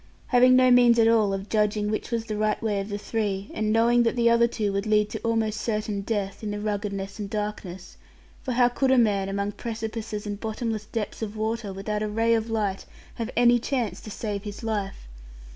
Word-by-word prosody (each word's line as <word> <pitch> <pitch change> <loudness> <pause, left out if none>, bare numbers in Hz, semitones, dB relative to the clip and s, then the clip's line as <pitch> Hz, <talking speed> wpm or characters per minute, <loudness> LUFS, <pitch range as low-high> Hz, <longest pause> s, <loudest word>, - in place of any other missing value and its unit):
Having 250 0 +6
no 255 0 +5
means 245 -1 +6
at 225 -1 +5
all 220 -3 +4
of 195 +1 -4
judging 210 -1 +1
which 215 - -3
was 230 -1 -2
the 215 -1 -4
right 215 0 0
way 210 -3 0
of 195 +1 -5
the 205 - -3
three, 205 -2 -3
and 215 0 -1
knowing 235 +2 +4
that 230 0 +1
the 235 -1 +3
other 235 0 +5
two 210 -4 -2
would 200 +2 -2
lead 210 -1 +2
to - - -4
almost 225 -2 -1
certain 210 -2 -2
death, 200 -1 -3
in 215 - -4
the 205 0 -3
ruggedness 200 -1 -3
and 205 -1 -4
darkness, 205 -4 -5 0.4
for 255 - -3
how 245 0 +5
could 260 +2 0
a 265 - +5
man, 200 -5 +2
among 200 +1 -2
precipices 220 -1 -5
and 205 -1 -4
bottomless 220 -1 -3
depths 225 -1 -4
of 215 -1 -4
water, 220 -1 -2
without 210 +2 -3
a 215 - -1
ray 225 +2 +2
of 225 0 0
light, 210 -4 -2 0.3
have 230 -1 -4
any 240 0 +5
chance 240 -3 -2
to - - -9
save 205 -1 -4
his 205 +2 -8
life? 205 - -3
215 Hz, 215 wpm, -25 LUFS, 205-230 Hz, 0.4 s, Having